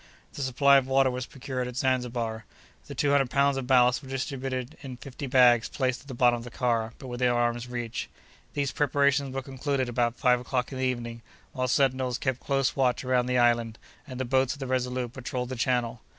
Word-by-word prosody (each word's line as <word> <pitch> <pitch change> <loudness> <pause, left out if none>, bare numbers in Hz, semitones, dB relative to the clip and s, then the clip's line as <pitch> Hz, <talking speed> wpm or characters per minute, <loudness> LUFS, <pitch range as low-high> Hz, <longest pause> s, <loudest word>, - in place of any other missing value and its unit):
The - - -6
supply 140 +1 +4
of 135 -1 +1
water 135 0 +3
was 125 0 -4
procured 130 -1 -4
at 125 - -7
Zanzibar. 125 -4 -1 0.4
The - - -8
two 145 - +1
hundred 140 -3 +3
pounds 140 +1 +2
of 135 -2 -4
ballast 125 -1 +4
were 135 - -12
distributed 130 -1 -4
in 130 -2 -8
fifty 135 +3 -7
bags 125 -3 +5
placed 130 -2 -1
at 140 - -19
the 130 - -7
bottom 120 0 +4
of - - -9
the 120 - -8
car, 115 -2 -1
but - - -11
within 125 0 0
arm's 120 0 0
reach. 120 -2 -4 0.5
These 140 -2 0
preparations 140 -1 +1
were 135 0 -4
concluded 135 0 -2
about 120 0 0
five 125 -2 +3
o'clock 125 +1 -2
in 130 - -5
the 130 - +1
evening, 120 -2 -3 0.3
while 130 -3 -1
sentinels 130 -1 +1
kept 130 -3 -2
close 135 -2 0
watch 130 -1 +1
around 125 -1 +2
the 125 0 +1
island, 120 -2 +2 0.3
and 130 -2 -7
the 130 - -1
boats 130 +1 +2
of 140 - -12
the 135 - -4
Resolute 125 -1 -2
patrolled 125 -1 -4
the 130 - -4
channel. 120 -2 -1
130 Hz, 210 wpm, -27 LUFS, 120-135 Hz, 0.5 s, bags